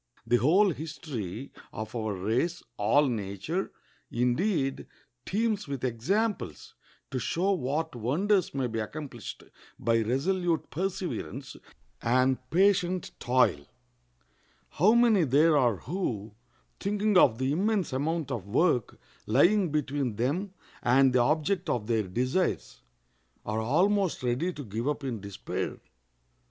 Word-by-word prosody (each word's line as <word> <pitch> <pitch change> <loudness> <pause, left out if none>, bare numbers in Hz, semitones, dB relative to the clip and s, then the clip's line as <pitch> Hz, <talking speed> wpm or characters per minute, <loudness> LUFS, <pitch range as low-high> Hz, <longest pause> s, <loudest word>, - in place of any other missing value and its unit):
The 120 - +3
whole 180 - +4
history 140 - -6 0.2
of 110 +2 -6
our 110 -3 -2
race, 120 - -1
all 145 +8 +3
nature, 115 - -3 0.4
indeed, 135 - 0 0.4
teems 215 -1 0
with 140 -3 -5
examples 145 - -1 0.4
to 130 - -1
show 175 - 0
what 160 -2 -1
wonders 180 - +1
may 135 -2 0
be 115 -2 -2
accomplished 120 -1 -6 0.3
by 115 0 +2
resolute 165 - 0
perseverance 175 -6 -4 0.5
and 130 +2 +2
patient 185 -1 +2
toil. 120 - +2 1.0
How 195 +8 +4
many 230 -6 +5
there 150 +3 +4
are 125 -6 +3
who, 115 - -4 0.5
thinking 210 +1 0
of 125 -10 +6
the 130 +2 0
immense 195 0 0
amount 150 +2 -1
of 110 -6 -4
work 125 - +1 0.3
lying 175 - +4
between 140 -5 -1
them 170 - -1 0.3
and 130 +1 +4
the 125 - +4
object 155 +7 +1
of 120 -6 -1
their 110 -3 0
desires, 130 - -1 0.6
are 110 +1 -1
almost 185 - +1
ready 125 +9 0
to 145 -4 -8
give 110 +4 -4
up 150 0 -1
in 120 -6 -3
despair! 100 -1 -4
140 Hz, 120 wpm, -28 LUFS, 120-180 Hz, 1.0 s, of